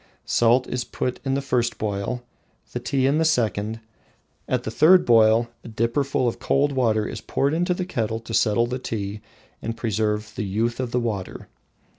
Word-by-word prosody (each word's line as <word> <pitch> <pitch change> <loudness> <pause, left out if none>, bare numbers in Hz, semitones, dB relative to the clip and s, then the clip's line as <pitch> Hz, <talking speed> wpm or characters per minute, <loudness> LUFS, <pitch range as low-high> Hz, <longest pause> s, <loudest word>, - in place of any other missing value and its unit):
Salt 120 +2 +3
is 125 -1 -3
put 125 +1 -3
in 135 -1 0
the 140 - -1
first 120 -3 0
boil, 105 +4 -3 0.5
the 125 - -2
tea 130 +2 0
in 140 +3 +3
the - - +3
second. 110 - 0 0.7
At 125 -1 0
the 110 - -4
third 170 +9 +6
boil, 115 0 +5
a - - -10
dipperful 120 +4 0
of 120 - -2
cold 140 +2 +2
water 115 -5 +1
is - - -6
poured 140 +2 0
into 175 +2 +1
the 185 - -3
kettle 110 - -2
to 115 0 -8
settle 110 +1 +3
the 125 +2 -3
tea 105 -3 -4 0.4
and 115 0 -4
revive 105 -1 -1
the 115 - -2
"youth 115 +5 -1
of 130 -2 -2
the 125 - 0
water." 105 -6 -4
120 Hz, 185 wpm, -24 LUFS, 110-130 Hz, 0.7 s, third